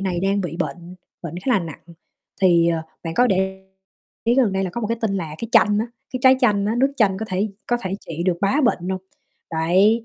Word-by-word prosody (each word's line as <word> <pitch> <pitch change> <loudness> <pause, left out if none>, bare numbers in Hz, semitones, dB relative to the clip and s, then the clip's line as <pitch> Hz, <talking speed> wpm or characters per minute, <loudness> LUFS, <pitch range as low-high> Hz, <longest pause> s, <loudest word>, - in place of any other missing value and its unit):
này 185 -3 -1
đang 195 +2 +1
bị 170 -4 -4
bệnh, 175 0 -5 0.3
bệnh 170 -2 -6
khá - - +1
là 220 - +4
nặng 165 -4 -8 0.6
thì, 170 -3 +5
ờ, 165 -1 0 0.2
bạn 165 0 -4
có 245 - +4
để 190 -2 -1 0.6
ý 235 +1 +3
gần 245 -6 +3
đây 190 0 0
là 185 - -3
có 235 - -4
một 220 - -1
cái 230 +1 -2
tin 215 -4 0
là 165 -5 -4
cái 230 - -5
chanh 210 -3 +5
á, 225 - 0 0.3
cái 255 - -3
trái 260 0 +7
chanh 205 -5 +3
á, 215 - 0
nước 270 +2 +3
chanh 200 -6 +3
có 220 - -4
thể 195 +3 0 0.2
có 240 - +1
thể 190 -4 -3
trị 165 0 -5
được 180 -2 +1
bá 205 +9 +2
bệnh 180 -7 +1
hông? 190 0 -2 0.5
Đấy, 185 +8 +3
195 Hz, 245 wpm, -22 LUFS, 175-225 Hz, 0.6 s, trái